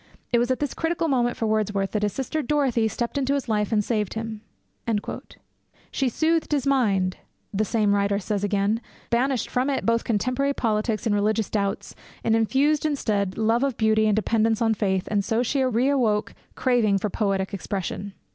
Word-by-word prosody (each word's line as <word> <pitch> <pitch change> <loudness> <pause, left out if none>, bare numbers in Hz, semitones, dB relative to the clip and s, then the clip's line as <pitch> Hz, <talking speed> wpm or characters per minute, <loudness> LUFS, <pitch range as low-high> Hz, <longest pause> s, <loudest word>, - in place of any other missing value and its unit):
It 240 - +4
was 240 +1 +1
at 255 - +1
this 290 -2 -2
critical 330 0 -1
moment 245 -4 +1
for 225 - -1
Wordsworth 210 -2 0
that 210 - -1
his 210 -1 +1
sister 270 +7 -2
Dorothy 265 -5 +1
stepped 235 +5 -2
into 275 +1 +1
his 280 - -3
life 210 -1 0
and 210 -2 +2
saved 210 -3 -1
him.' 220 -1 -5 1.5
'She 270 -2 0
soothed 320 +6 0
his 285 -3 +1
mind,' 200 -9 +2 0.4
the 205 +2 +1
same 210 -1 +1
writer 200 0 +1
says 205 0 -2
again, 205 +2 +1 0.3
banished 250 +1 +1
from 255 +2 0
it 275 - -1
both 230 0 +2
contemporary 255 +5 0
politics 215 -2 -1
and 220 - +2
religious 210 +1 +1
doubts, 200 -2 -2 0.3
and 225 - +3
infused 270 +7 +2
instead 210 -10 -1
love 225 +3 +2
of 275 -4 -1
beauty 220 -1 +3
and 210 - +3
dependence 220 +1 +1
on 225 -1 +2
faith, 190 -3 -1
and 205 -1 +1
so 225 +3 0
she 270 +3 0
re 255 0 +2
awoke 225 -7 +1 0.2
craving 235 -6 +2
for 200 +1 -2
poetic 195 -2 -1
expression.' 200 0 -4
225 Hz, 185 wpm, -24 LUFS, 205-255 Hz, 1.5 s, It